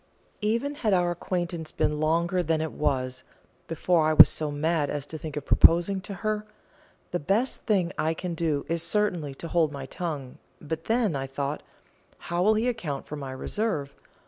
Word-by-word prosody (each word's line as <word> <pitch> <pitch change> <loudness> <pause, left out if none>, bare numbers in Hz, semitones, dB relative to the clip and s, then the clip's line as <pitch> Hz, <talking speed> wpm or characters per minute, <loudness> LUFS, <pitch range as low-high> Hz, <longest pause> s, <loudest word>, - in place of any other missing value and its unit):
Even 230 +7 0
had 225 -8 0
our 175 -1 +2
acquaintance 175 -2 -3
been 150 0 0
longer 170 +4 +1
than 160 -2 0
it 160 -1 -2
was, 130 -3 -1 0.4
before 165 0 +2
I 155 - +3
was - - +10
so 155 -1 -2
mad 150 0 0
as 145 -1 -3
to 160 - -8
think 155 -2 -6
of 145 - -4
proposing 175 +3 +5
to 200 - -7
her, 215 0 0 0.7
the 175 - -1
best 205 - 0
thing 190 -5 +2
I 160 +1 +1
can 180 +1 -4
do 155 -4 -1
is 165 0 0
certainly 170 -5 0
to 165 - -7
hold 165 -2 +2
my 140 -2 -6
tongue; 145 -4 -5 0.2
but 160 +2 -5
then, 225 -7 +1
I 135 -1 -3
thought, 140 +2 -3 0.6
how 175 +1 -3
will 215 +4 +4
he 225 +3 +1
account 165 - -3
for 150 - -6
my 140 -3 -6
reserve? 145 0 -2
165 Hz, 185 wpm, -27 LUFS, 145-185 Hz, 0.7 s, was